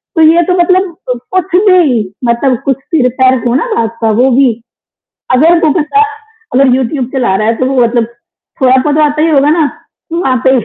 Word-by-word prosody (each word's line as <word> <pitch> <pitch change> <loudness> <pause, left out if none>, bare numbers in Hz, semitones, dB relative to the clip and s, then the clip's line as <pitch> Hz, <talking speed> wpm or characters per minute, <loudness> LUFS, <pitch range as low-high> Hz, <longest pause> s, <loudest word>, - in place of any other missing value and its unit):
तो 325 - +2
ये 335 +2 +4
तो - - +2
मतलब 370 +1 +1 0.2
अ, - - +1 0.2
कुछ 370 0 -1
भी 320 -11 +3 0.3
मतलब 235 +2 0
कुछ 270 -2 0
सिर-पैर 260 -2 0
हो 240 - 0
ना 280 - 0
बात 230 0 -3
का 225 - +1
वो 265 - +3
भी 270 -3 +4 0.8
अगर 310 +7 +4
वो - - +3
बंदा 355 +6 0 0.5
अगर 270 +1 +3
यूट्यूब 260 +1 -2
चला 245 -8 0
रहा 215 +2 -1
है 230 - +1
तो 255 - -1
वो 260 -1 0
मतलब 235 0 +1 0.6
थोड़ा-बहुत 260 +3 +2
तो 310 - +2
आता 300 0 0
ही 325 - +2
होगा 290 -1 +2
ना, 320 +1 +2 0.5
वहाँ 300 -7 0
पे - - +5
270 Hz, 195 wpm, -10 LUFS, 250-320 Hz, 0.8 s, पे